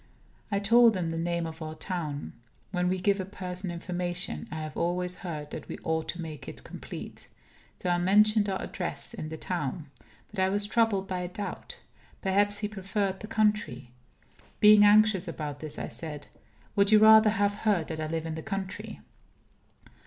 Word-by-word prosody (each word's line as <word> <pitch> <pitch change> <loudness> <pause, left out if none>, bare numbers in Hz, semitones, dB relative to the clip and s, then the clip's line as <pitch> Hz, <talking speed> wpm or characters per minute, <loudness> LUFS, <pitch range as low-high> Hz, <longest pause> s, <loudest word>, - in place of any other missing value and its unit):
I 200 - +1
told 230 +1 +5
him 170 -3 -2
the 165 - -3
name 170 0 -1
of 160 0 -8
our 155 0 -5
town. 155 -6 -4 0.4
When 180 -1 0
we 185 0 0
give 200 +2 +2
a - - -1
person 185 -1 -6
information, 175 - -3
I 160 - -6
have 155 -1 -7
always 180 +1 -1
heard 150 -5 -6
that - - -7
we - - -5
ought 160 -1 -1
to 175 - -4
make 155 -3 -8
it - - -8
complete. - - -9 0.5
So - - -4
I 175 - +2
mentioned 210 +3 +4
our 190 - -2
address 150 -6 -3
in 155 - -6
the 160 - -6
town. 155 -3 -4 0.4
But 210 - -6
I 190 0 +3
was 205 +1 +2
troubled 210 -3 +1
by 185 -1 -3
a 180 - -3
doubt. 205 +3 -7 0.4
Perhaps 205 +1 +4
he 210 - -1
preferred 195 -1 -2
the 215 - -8
country. 210 - 0 0.7
Being 210 0 +8
anxious 205 -2 +5
about 150 -3 -5
this, 155 -1 +1
I - - -4
said: 150 -3 -5 0.5
"Would 200 0 +3
you 215 - +8
rather 220 0 +8
have 205 -1 +1
heard 200 -8 +1
that 160 -1 -4
I 155 - -2
live 160 0 -3
in 160 - -4
the 160 - -5
country?" 195 -2 -5
185 Hz, 185 wpm, -28 LUFS, 165-205 Hz, 0.7 s, Being